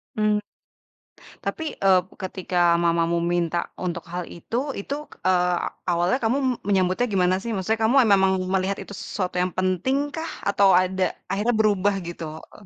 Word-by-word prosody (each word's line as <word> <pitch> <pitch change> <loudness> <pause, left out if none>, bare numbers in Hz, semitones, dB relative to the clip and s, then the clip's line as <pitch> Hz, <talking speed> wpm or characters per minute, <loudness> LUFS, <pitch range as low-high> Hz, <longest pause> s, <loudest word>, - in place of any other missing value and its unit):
Mmm. 215 -1 +2 1.0
Tapi, 320 - -3
eee, 190 -2 +4 0.2
ketika 180 -2 +1
mamamu 170 0 +2
minta 170 0 0
untuk 175 -2 -3
hal 175 0 -4
itu, 245 - -4
itu, 275 +8 -4 0.3
eee, 180 -1 +3 0.3
awalnya 175 +6 +2
kamu 230 +5 +2 0.3
menyambutnya 190 +3 +2
gimana 185 -1 +3
sih? 235 - -5
Maksudnya 215 +3 -1
kamu 240 - +3 0.2
memang 190 -1 +4 0.2
melihat 190 +1 0
itu - - -11
sesuatu 185 -3 -4
yang 180 -1 -1
pentingkah 270 - -1 0.2
atau 200 -1 +4
ada 185 +1 +2 0.2
akhirnya 220 +5 +1
berubah 205 -2 +3
gitu? 170 -1 -6 0.3
Eh. 205 - -16
185 Hz, 140 wpm, -24 LUFS, 180-210 Hz, 1.0 s, eee